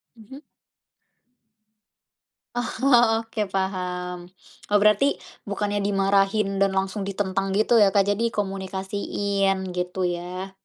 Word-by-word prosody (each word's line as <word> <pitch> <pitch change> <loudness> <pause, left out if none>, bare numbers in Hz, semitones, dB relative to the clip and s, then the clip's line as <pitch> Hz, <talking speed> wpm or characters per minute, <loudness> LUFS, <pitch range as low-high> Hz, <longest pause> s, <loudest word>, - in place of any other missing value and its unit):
Mhm. 235 +6 -13 2.1
Oh, 240 -2 +3
oke 220 -2 -3
paham. 180 -2 -3 0.4
Eee, 205 - 0
berarti 210 +4 +4 0.4
bukannya 205 0 -1
dimarahin 195 0 +1
dan 195 -1 +2
langsung 195 +2 -1
ditentang 195 -1 -1
gitu 220 +2 +4
ya, 205 - +6
Kak, 200 - +6
jadi 225 +3 0
komunikasiin 195 0 -2
gitu 180 +1 -3
ya. 180 +2 -4
195 Hz, 100 wpm, -24 LUFS, 190-210 Hz, 2.1 s, ya